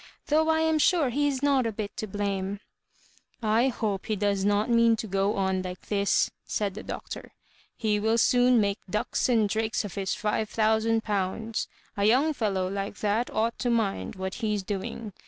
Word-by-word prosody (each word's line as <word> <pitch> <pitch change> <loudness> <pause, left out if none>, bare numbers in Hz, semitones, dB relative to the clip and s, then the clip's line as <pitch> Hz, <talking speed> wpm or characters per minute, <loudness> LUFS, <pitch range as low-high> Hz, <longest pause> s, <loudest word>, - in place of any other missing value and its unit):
Though 315 +2 +3
I 320 0 +3
am 320 -1 +2
sure 305 -5 +3
he 290 +4 +1
is 275 -1 -2
not 275 -4 +3
a - - -1
bit 205 -1 -5
to 215 - -3
blame." 200 0 -2 0.5
" - - -31 0.2
I 250 - +4
hope 215 -6 -2
he 215 - 0
does 200 -1 0
not 205 +1 +2
mean 230 -1 +4
to 225 - -5
go 195 +1 0
on 190 -1 0
like 180 0 -8
this," 200 -1 +2
said 205 -2 -2
the 215 - -7
Doctor. - - -7 0.4
He 210 -2 +1
will 220 +2 +2
soon 245 +1 +4
make 200 -1 0
ducks 210 +5 0
and 225 -4 +3
drakes 220 +1 -1
of 200 - -6
his 195 -2 -2
five 215 0 -1
thousand 220 0 +2
pounds. 210 +2 -2 0.3
^ 200 +1 +3
young 275 +8 +4
fellow 200 -7 -1
like 195 +1 -4
that 215 +3 +1
ought 230 +2 -1
to 245 - 0
mind 200 - 0
what 190 0 -4
he*s 210 -4 -2
doing. 205 +2 -5
215 Hz, 190 wpm, -27 LUFS, 200-230 Hz, 0.5 s, I